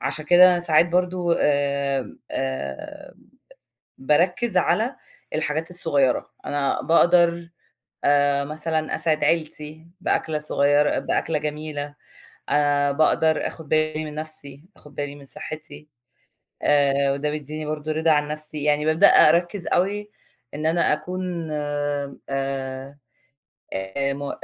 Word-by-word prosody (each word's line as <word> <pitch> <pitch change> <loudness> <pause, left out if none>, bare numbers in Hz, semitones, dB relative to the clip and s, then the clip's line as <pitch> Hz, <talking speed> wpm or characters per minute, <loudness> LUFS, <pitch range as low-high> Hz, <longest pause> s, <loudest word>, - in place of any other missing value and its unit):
عشان 155 - -1
كده 180 +2 +7
أنا 175 - +2
ساعات 165 0 +3
برضه 180 -1 +1
آآ، 140 -2 0
آآ، 130 - -5 0.8
باركّز 175 - +1
على 235 +5 +1 0.4
الحاجات 155 +2 -2
الصغيّرة، 145 -7 +1 0.2
أنا 145 -1 -1
باقدر 170 0 +3 0.6
آآ، 140 0 +3
مثلًا 155 +1 -2
أسعِد 155 -2 +1
عيلتي، 155 0 -2
بأكلة 155 -3 0
صغيّرة 145 -1 +2
بأكلة 160 -2 -1
جميلة 150 -1 -5 0.5
آآ، 145 -1 +2
باقدر 155 +1 +2
آخُد 160 -3 -8
بالي 155 0 0
من 150 -1 -7
نَفْسي، 150 -2 -7
آخُد 150 -1 -17
بالي 145 0 -4
من 140 -1 -14
صحّتي. 155 +2 -9 0.7
آآ، 140 -1 +3
وده 145 +2 -2
بيديني 150 +1 -5
برضه 155 0 -3
رِضا 160 +1 +1
عن 150 -1 +2
نَفْسي. 150 -1 -5
يعني 150 0 +2
بابدأ 160 +6 +5
أركّز 175 +3 +4
أوي 205 +3 0 0.4
إن 155 +2 -3
أنا 165 0 +2
أكون 175 +1 -4
آآ 145 -2 -3
آآ، 135 0 -4 1.2
م 140 0 -5
150 Hz, 120 wpm, -23 LUFS, 145-165 Hz, 1.2 s, كده